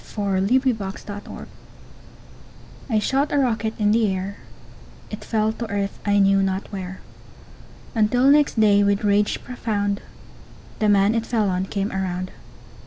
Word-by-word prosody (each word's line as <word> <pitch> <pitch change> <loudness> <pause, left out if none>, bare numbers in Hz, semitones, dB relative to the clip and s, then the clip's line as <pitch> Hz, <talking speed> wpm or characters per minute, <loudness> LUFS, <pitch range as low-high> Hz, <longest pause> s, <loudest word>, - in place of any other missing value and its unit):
ENOUGH 200 +5 +1
BY 260 - +5
TOM - - -7 0.4
MASSON - - -10 1.4
I 225 - +2
shot 270 +7 +1
a - - +1
rocket 225 -4 0
in 210 -1 +3
the 225 0 +3
air, 190 +2 -4 0.7
It 215 - -7
fell 220 -1 0
to 230 0 -6
earth, 200 -1 -3
I 205 0 +2
knew 195 0 +4
not 190 0 -1
where 190 -2 -6 0.9
Until 245 +4 +3
next 290 -5 +3
day, 205 -2 +5
with 200 0 +1
rage 205 0 +1
profound, 205 -5 -2 0.8
The 215 - +2
man 200 +1 +4
it 230 0 -1
fell 220 -4 +1
on 185 +1 -1
came 200 0 -2
around. 185 -1 -3
205 Hz, 150 wpm, -22 LUFS, 195-225 Hz, 1.4 s, BY